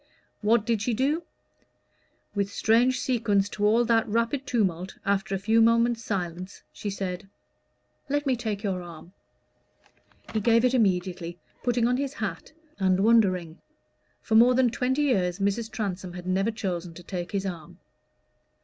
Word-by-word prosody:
What 220 0 +3
did 230 -3 0
she 240 0 0
do? 285 +7 +1 1.1
With 200 -1 -1
strange 240 +5 +3
sequence 215 -6 +1
to 205 - -5
all 225 +3 +4
that 225 -1 +2
rapid 230 +5 -1
tumult, 190 -7 -1
after 195 -1 0
a - - 0
few 220 +4 +2
moments' 230 0 +3
silence 180 -2 -4
she 205 - -5
said 195 0 -5 0.8
"Let 290 +1 0
me 265 -2 +2
take 220 -3 -4
your 190 -3 -1
arm." 170 +1 -11 1.2
He 220 - +1
gave 230 +2 +4
it 250 - +2
immediately, 180 -6 0 0.2
putting 240 -1 +1
on 250 +1 +1
his 280 0 -2
hat 195 - -5 0.3
and 190 -1 +2
wondering. 185 -7 +2 0.6
For - - -3
more 240 +3 +6
than 255 -2 +3
twenty 260 +4 0
years 185 -10 +1
Mrs. 200 +3 -1
Transome 190 -5 -4
had 180 0 -8
never 190 +3 +1
chosen 180 -6 -4
to 175 - -11
take 175 -2 -5
his 200 -1 -2
arm. 170 -5 -7
210 Hz, 155 wpm, -26 LUFS, 185-235 Hz, 1.2 s, more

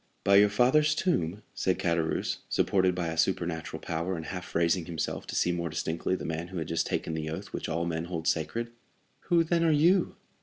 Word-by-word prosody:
"By 100 0 +6
your 105 +1 +6
father's 150 +8 +3
tomb!" 100 - 0
said 95 - 0
Caderousse, 85 -2 0
supported 95 -2 +2
by 85 -2 -1
a 80 - -4
supernatural 80 -2 -1
power, 85 +3 -3
and 80 - -6
half 90 +1 -7
raising 85 +1 +2
himself 80 -2 -4
to - - -5
see 90 - +2
more 85 -1 -2
distinctly 80 +3 -1
the - - -6
man 80 +1 -3
who 95 0 -7
had 80 -2 -3
just 80 - 0
taken - - -2
the 80 -1 -3
oath 95 +5 -6
which - - -4
all 85 +1 -1
men 80 -1 -2
hold 85 -2 -4
sacred; 115 +9 -1 0.5
"who, 170 -2 +4
then, 170 +1 +1
are 165 - +4
you?" 170 +5 +3
85 Hz, 205 wpm, -29 LUFS, 80-100 Hz, 0.5 s, By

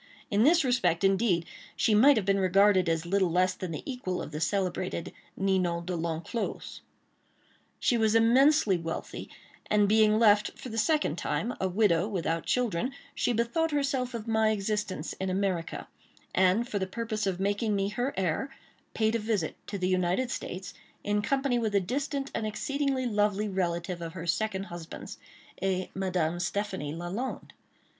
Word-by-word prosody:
In 205 0 +3
this 320 +6 +5
respect, 195 -10 +1
indeed, 195 -3 +2 0.3
she 220 - +2
might 260 +6 +6
have 210 - 0
been 195 0 +2
regarded 190 -1 +4
as 165 0 0
little 190 +1 +2
less 185 +2 +2
than 185 -1 -6
the 155 - -5
equal 245 -9 -3
of - - -6
the 150 +1 -5
celebrated 185 -1 -1 0.2
Ninon 185 -3 0
De 180 0 -2
L'Enclos. 165 +6 -4 1.0
She 240 - +2
was 220 0 +3
immensely 235 - +5
wealthy, 165 0 -5 0.4
and 210 -1 +4
being 215 0 +4
left, 210 -2 +4
for 255 - -8
the 225 - -5
second 300 - +1
time, 160 +12 -1
a 190 - +2
widow 185 -2 +2
without 165 -5 -2
children, 245 0 0 0.2
she - - 0
bethought 235 +8 +1
herself 275 -4 -1
of 230 -1 -6
my 220 -1 +3
existence 210 -5 -2
in 190 - -1
America, 185 -3 -2 0.5
and 190 +6 +3
for 210 -5 -2
the 190 - -2
purpose 215 0 -3
of 185 -2 -1
making 205 +2 0
me 195 0 0
her 245 +5 -1
heir, 190 - 0 0.5
paid 220 0 +2
a 230 - +1
visit 210 -6 -1
to 200 - -4
the 185 -1 -1
United 185 +7 +1
States, 180 -4 -5 0.3
in 205 0 +1
company 270 +1 +1
with 220 -3 -1
a - - +6
distant 275 - -3
and 220 - -2
exceedingly 275 +3 -1
lovely 210 -2 +1
relative 175 -2 -2
of 165 -1 -5
her 170 -2 -6
second 195 +2 -1
husband's—a 185 +1 -6
Madame 180 -3 -1
Stéphanie 175 -4 -3
Lalande. 190 +10 -4
200 Hz, 165 wpm, -29 LUFS, 180-230 Hz, 1.0 s, might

